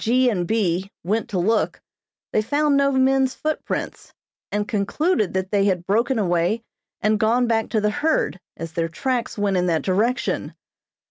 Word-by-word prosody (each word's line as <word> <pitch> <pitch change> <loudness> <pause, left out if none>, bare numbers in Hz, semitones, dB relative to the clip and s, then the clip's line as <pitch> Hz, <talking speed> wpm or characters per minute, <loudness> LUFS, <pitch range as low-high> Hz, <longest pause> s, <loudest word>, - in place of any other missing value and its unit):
G. 250 +2 +3
and 180 -5 -1
B. 190 -3 0
went 210 +5 -1
to 195 - -2
look, 210 +5 +1 0.5
they 215 - +3
found 290 +6 +1
no 275 0 +3
men's 265 0 +2
footprints, 310 0 -4 0.4
and 205 0 -1
concluded 215 - 0
that 190 0 -1
they 200 -1 +3
had 180 -3 0
broken 230 +6 +1
away 180 +3 +1 0.4
and 215 0 +2
gone 235 +3 +3
back 225 -1 0
to 220 - +1
the 210 0 +1
herd, 290 - 0 0.2
as 165 -1 -6
their 165 0 -1
tracks 250 +7 -2
went 200 -2 +1
in 180 0 +1
that 160 -4 +1
direction. 220 +7 0
215 Hz, 170 wpm, -22 LUFS, 190-250 Hz, 0.5 s, G